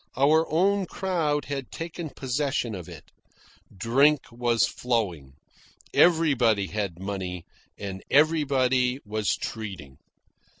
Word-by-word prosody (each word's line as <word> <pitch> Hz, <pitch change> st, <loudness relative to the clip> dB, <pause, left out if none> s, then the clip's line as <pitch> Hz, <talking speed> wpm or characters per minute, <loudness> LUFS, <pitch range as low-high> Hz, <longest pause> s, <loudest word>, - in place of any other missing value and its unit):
Our 155 Hz, +4 st, +3 dB
own 190 Hz, +4 st, +2 dB
crowd 165 Hz, -7 st, -1 dB
had 135 Hz, -3 st, -5 dB
taken 165 Hz, 0 st, -6 dB
possession 130 Hz, -3 st, -2 dB
of 90 Hz, -4 st, -7 dB
it. -, -, -12 dB, 0.6 s
Drink 130 Hz, +9 st, +2 dB
was 120 Hz, -1 st, +2 dB
flowing. 95 Hz, -, -2 dB, 0.6 s
Everybody 135 Hz, -, +4 dB
had 100 Hz, -2 st, -3 dB
money, 95 Hz, -2 st, -5 dB, 0.3 s
and 95 Hz, -1 st, -6 dB
everybody 135 Hz, -4 st, +3 dB
was 105 Hz, -1 st, -1 dB
treating. 95 Hz, -12 st, -7 dB
125 Hz, 100 wpm, -26 LUFS, 100-150 Hz, 0.6 s, Everybody